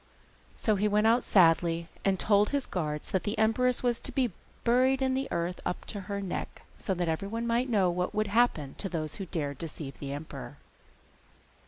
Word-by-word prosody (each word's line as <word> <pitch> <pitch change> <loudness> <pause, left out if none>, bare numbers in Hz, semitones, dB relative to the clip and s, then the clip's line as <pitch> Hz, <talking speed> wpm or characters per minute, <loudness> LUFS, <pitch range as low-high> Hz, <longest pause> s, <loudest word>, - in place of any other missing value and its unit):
So 215 -2 +1
he 210 +2 +2
went 210 +1 +2
out 235 +2 +4
sadly 170 -2 +4 0.2
and 195 -2 +2
told 205 -1 +4
his 280 -2 0
guards 150 -4 -3
that 190 - +1
the 210 +2 -3
empress 240 +4 +2
was 240 -2 +1
to - - -5
be 255 -5 +1 0.3
buried 255 +3 +4
in 265 -1 +1
the 270 +1 -1
earth 170 +1 -2
up - - -3
to 205 - -5
her 200 0 -2
neck, 195 -3 -5 0.2
so 190 - -1
that 175 -1 -1
everyone 200 +8 -2
might 235 +2 +1
know 195 -6 +3
what 180 +1 -2
would 215 0 +2
happen 200 - +2
to 195 - -3
those 155 -3 -3
who 190 - -5
dared 145 -5 -3
to 165 - -3
deceive 145 -3 -8
the 140 -1 -5
emperor. 145 - -7
200 Hz, 200 wpm, -29 LUFS, 165-235 Hz, 0.3 s, out